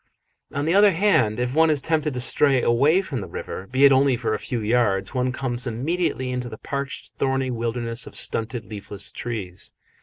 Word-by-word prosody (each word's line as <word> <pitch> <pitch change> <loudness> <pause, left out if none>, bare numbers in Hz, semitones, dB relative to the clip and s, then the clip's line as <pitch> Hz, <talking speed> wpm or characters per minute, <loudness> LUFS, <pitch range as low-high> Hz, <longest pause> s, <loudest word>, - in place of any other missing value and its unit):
On 145 +1 -2
the 165 - +2
other 200 0 +6
hand, 155 - +2
if 125 +1 -1
one 160 +2 +4
is 150 -2 +2
tempted 155 -1 -1
to - - -2
stray 135 +1 +2
away 145 +11 +3
from 135 - -4
the 95 - -6
river, 95 - -7
be 130 +3 +4
it 140 - +7
only 135 -1 +4
for 115 -2 -1
a 105 - -2
few 120 - -3
yards, 105 -3 +1
one 125 -1 0
comes 125 -1 0
immediately 130 +2 -1
into 125 -1 -3
the 110 - -8
parched, 140 +4 -5
thorny 135 -1 0
wilderness 115 0 -2
of - - -11
stunted, 115 +1 -3
leafless 100 -1 -6
trees. 100 -6 -6
125 Hz, 195 wpm, -23 LUFS, 115-140 Hz, -, it